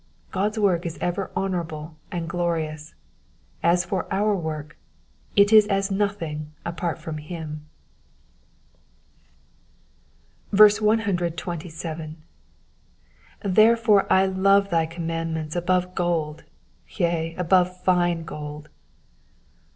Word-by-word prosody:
God's 210 +3 -1
work 190 -5 +2
is 170 -3 -5
ever 180 +2 -2
honourable 165 -4 -3 0.2
and 170 -2 -3
glorious; 160 -3 -3 0.7
as 175 +1 +3
for 190 - -3
our 210 +1 +2
work, 155 -4 -5 0.6
it 200 +2 +5
is 215 -1 +8
as 195 0 0
nothing 170 -7 -2
apart 170 0 -3
from 155 -1 -6
him. 155 -1 -7 2.8
127. 175 -6 +1 1.3
^*' 195 -2 -1
Therefore 215 -2 +5
I 190 0 +5
love 195 +1 +3
thy 165 -1 +2
commandments 165 -1 -4
above 180 +1 0
gold; 165 -4 -2 0.4
yea, 165 -3 -1
above 180 +1 +2
fine 175 -2 +2
gold.'' 150 -1 -8
175 Hz, 95 wpm, -24 LUFS, 160-195 Hz, 2.8 s, is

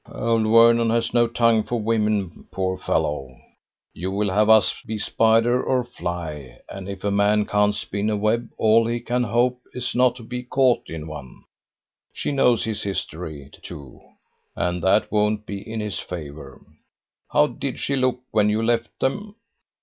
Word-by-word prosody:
"Old 115 -1 0
Vernon 115 +1 +5
has 115 0 0
no 120 -1 +4
tongue 115 -1 +3
for 120 +2 -3
women, 105 -5 -1
poor 95 -1 -2
fellow! 65 -3 -2 0.6
You 90 +3 -4
will 100 +1 -1
have 105 +3 +2
us 110 -1 +6
be 110 - -3
spider 115 +3 +2
or 130 -1 +1
fly, 80 - -6
and 95 0 -8
if 100 -1 -7
a 100 - 0
man 105 +1 +2
can't 105 0 +2
spin 105 0 -3
a 105 - 0
web 110 +3 0
all 115 +1 +4
he 120 +1 -1
can 120 +1 -1
hope 120 +3 +1
is 125 -1 -3
not 125 -1 +3
to 125 - -11
be 125 +2 -5
caught 125 0 +1
in 80 -2 -6
one. 70 -6 -10 0.7
She - - -3
knows 125 -4 +3
his 110 -2 -3
history, 80 -7 -5
too, 70 -3 -11 0.5
and 90 0 -1
that 95 +4 +2
won't 105 0 +1
be 100 -1 -5
in 110 -1 -3
his 105 -2 -4
favour. 80 -4 -9 0.7
How 150 - +5
did 140 -3 -5
she 140 - -1
look 130 -1 0
when 105 -1 +3
you 110 +2 0
left 120 0 -1
them?" 205 +10 -2
110 Hz, 170 wpm, -23 LUFS, 95-120 Hz, 0.7 s, us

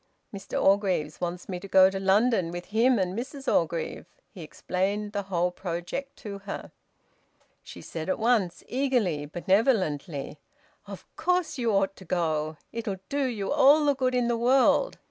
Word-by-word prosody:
"Mr 195 - -4
Orgreave 190 -6 +1
wants 175 0 -4
me 180 -2 -4
to 195 - -9
go 190 -1 +7
to 195 0 -2
London 195 -1 +2
with 175 +1 -6
him 240 +3 +4
and 185 -1 -1
Mrs 270 +4 -6
Orgreave." 485 -1 -1 0.2
He - - -11
explained 200 +3 -2
the 205 - -1
whole 180 -1 +1
project 180 +10 -5
to 200 -2 -6
her. 200 0 -7 0.9
She - - -11
said 160 +1 -6
at - - +1
once, 220 -6 +1
eagerly 245 - 0
and 145 0 -9
benevolently 175 - 0 0.5
"Of - - -9
course 360 -5 0
you 235 -2 +1
ought 195 -1 +1
to 190 - -13
go. 155 -3 -1
It'll 220 -4 -4
do 285 -1 0
you 215 -6 -3
all 295 +1 +5
the 285 - +4
good 255 -1 0
in 245 -1 +1
the 235 -1 +1
world. 260 - +3
200 Hz, 165 wpm, -27 LUFS, 180-250 Hz, 0.9 s, go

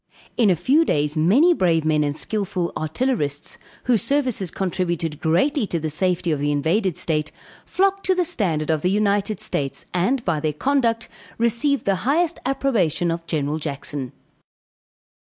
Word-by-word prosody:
In 225 -4 +3
a 180 - +4
few 265 - +3
days 150 - 0
many 225 - +4
brave 165 - +1
men 155 -1 +2
and 145 0 -2
skillful 185 -5 -2
artillerists, 155 - -2 0.2
whose 235 -5 +2
services 255 -10 0
contributed 175 -5 -2
greatly 220 - +1
to 170 - -2
the 155 0 -3
safety 175 +1 0
of 150 - 0
the 145 +1 0
invaded 165 +6 0
state, 155 -2 -1 0.4
flocked 390 +1 +1
to 375 - +3
the 360 -1 +1
standard 165 - 0
of 155 -2 0
the 180 - +1
United 205 0 +1
States, 140 -10 -3
and 235 +8 0
by 155 - +1
their 155 0 -1
conduct, 235 - 0 0.3
received 235 +5 +1
the 195 -1 +2
highest 330 - +1
approbation 200 - +1
of 165 0 -5
General 150 -1 -1
Jackson. 140 -3 -4
180 Hz, 155 wpm, -22 LUFS, 155-245 Hz, 0.4 s, a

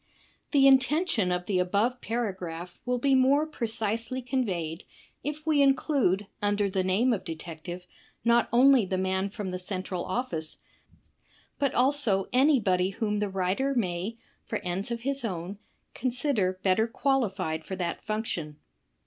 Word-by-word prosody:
I - - -31 0.3
The 275 -2 +6
intention 270 - +3
of 180 0 -1
the 190 -2 0
above 210 +8 +1
paragraph 185 -7 -4
will 250 0 +1
be 275 +3 +2
more 270 +3 +4
precisely 230 -3 -2
conveyed 190 - -2 0.4
if 300 +1 -4
we 305 -3 +3
include 270 - +2 0.2
imder 205 -1 +1
the 190 -2 +1
name 210 +7 +2
of 195 -4 -3
detect 165 -1 -7
ive 180 +1 -6 0.4
not 235 0 +4
only 255 +1 +6
the 185 0 -2
man 190 +1 0
from 195 -2 -5
the 180 - -3
central 185 -1 -4
oflSce, 180 -8 -2 1.0
but 280 -2 +1
also 250 -7 +3
any 270 +2 +5
body 185 -3 +1
whom 210 +1 -2
the 205 -1 -1
writer 195 +9 0
may, 195 0 -2 0.3
for 225 - -3
ends 180 +3 -3
of 235 -1 -3
his 275 +1 -2
own, 190 -1 -4 0.3
consider 245 -7 0
better 200 +4 +3
qualified 200 - 0
for 190 - -5
that 175 -2 -3
function. 195 -9 -3
210 Hz, 150 wpm, -28 LUFS, 185-255 Hz, 1.0 s, The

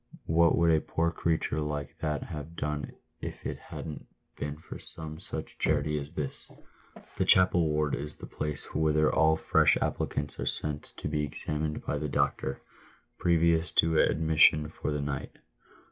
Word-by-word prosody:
" - - -41
"What 85 +1 +4
would 85 -1 +4
a 80 -1 +4
poor 85 +1 0
creature 80 -2 0
like 75 -2 -3
that 75 -2 -1
have 75 +2 -7
done 75 -2 -3 0.3
if - - -7
it - - -3
hadn't 75 -2 -8 0.3
been 75 0 -4
for 80 - -9
some 80 0 -7
such 95 - -5
charity 75 0 +1
as 70 +1 -8
this 70 -3 -2 0.3
?" - - -20
The - - +4
chapel 90 -3 +5
ward 75 -1 +1
is 75 +1 -4
the - - -9
place 75 -1 -5
whither 75 0 +3
all 80 0 +4
fresh - - +4
applicants 75 0 -2
are - - -2
sent 75 -1 -1
to - - -4
be 75 0 0
examined 75 +1 -3
by 75 - -1
the 75 0 -2
doctor, 70 0 -1 0.6
previous 85 0 +3
to 80 -1 +4
admission 80 -1 +4
for 80 - -4
the 75 -1 -1
night. 70 -2 -4
75 Hz, 170 wpm, -29 LUFS, 75-80 Hz, 0.6 s, chapel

